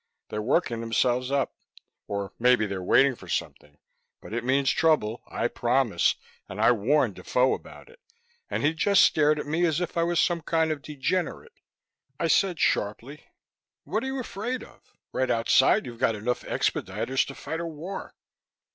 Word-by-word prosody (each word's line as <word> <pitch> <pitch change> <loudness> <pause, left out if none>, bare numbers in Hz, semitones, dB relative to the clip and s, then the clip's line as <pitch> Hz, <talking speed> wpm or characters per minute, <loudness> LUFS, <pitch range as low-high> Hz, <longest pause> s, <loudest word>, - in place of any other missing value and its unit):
They're 105 - -3
working 120 -1 0
themselves 125 +2 +1
up. 140 -1 0 0.5
Or 100 -1 -4
maybe 125 -2 +4
they're 100 -2 -4
waiting 135 +9 +4
for - - -13
something. 75 0 -4 0.4
But - - -11
it 120 0 -2
means 135 +2 +2
trouble, 150 -9 +1
I 115 - -1
promise, 120 -7 +1 0.3
and - - -7
I - - +5
warned 120 +1 +2
Defoe 125 +8 +1
about - - -9
it. 485 +1 -19 0.5
And - - -2
he 150 +2 +3
just 200 +5 +4
stared 150 0 +4
at 150 - -4
me 160 +4 0
as 165 -2 +2
if 180 -1 -4
I - - +3
was 170 0 +1
some 170 -2 +2
kind 160 0 +1
of 150 -2 -3
degenerate." 150 +5 -3 0.6
I 165 - 0
said 180 -1 +2
sharply, 115 +8 -1 0.6
"What - - -2
are - - -3
you 265 0 -3
afraid 245 +1 -4
of? - - -16 0.3
Right 130 -1 0
outside, 115 +4 +3
you've 120 -2 -9
got 115 - +2
enough 120 +4 -2
expediters 135 0 -1
to 140 - -8
fight 160 - -5
a 170 - -3
war." 165 +5 -7
135 Hz, 175 wpm, -26 LUFS, 115-165 Hz, 0.6 s, I